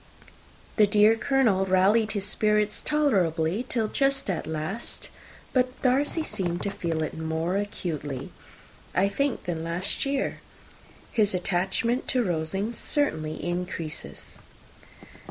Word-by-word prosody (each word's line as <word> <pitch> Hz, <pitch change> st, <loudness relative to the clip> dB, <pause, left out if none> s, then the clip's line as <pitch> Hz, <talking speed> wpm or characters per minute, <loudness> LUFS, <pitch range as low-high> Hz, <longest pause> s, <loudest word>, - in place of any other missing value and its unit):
The 210 Hz, -2 st, +6 dB
dear 210 Hz, +2 st, +5 dB
Colonel 225 Hz, -6 st, +2 dB
rallied 200 Hz, +4 st, +3 dB
his 200 Hz, -2 st, -1 dB
spirits 210 Hz, 0 st, +2 dB
tolerably 190 Hz, -, +1 dB
till 225 Hz, -3 st, +1 dB
just 275 Hz, -3 st, +1 dB
at 170 Hz, -, -3 dB
last; 160 Hz, +9 st, -4 dB, 0.4 s
but 255 Hz, -1 st, +1 dB
Darcy 280 Hz, +5 st, +2 dB
seemed 180 Hz, -, -2 dB
to 200 Hz, -, -1 dB
feel 165 Hz, -4 st, -2 dB
it 155 Hz, -, -4 dB
most 165 Hz, +5 st, -1 dB
acutely 150 Hz, -8 st, -4 dB
more, -, -, -7 dB, 0.7 s
I 195 Hz, -, +4 dB
think, 275 Hz, +6 st, -1 dB
than 165 Hz, -2 st, -3 dB
last 170 Hz, +4 st, -2 dB
year. 275 Hz, 0 st, -1 dB, 0.7 s
His 210 Hz, -4 st, +2 dB
attachment 190 Hz, +7 st, 0 dB
to 250 Hz, -2 st, +2 dB
Rosings 195 Hz, +5 st, -1 dB
certainly 155 Hz, -, +1 dB
increases." 175 Hz, -3 st, -5 dB
200 Hz, 120 wpm, -26 LUFS, 170-230 Hz, 0.7 s, The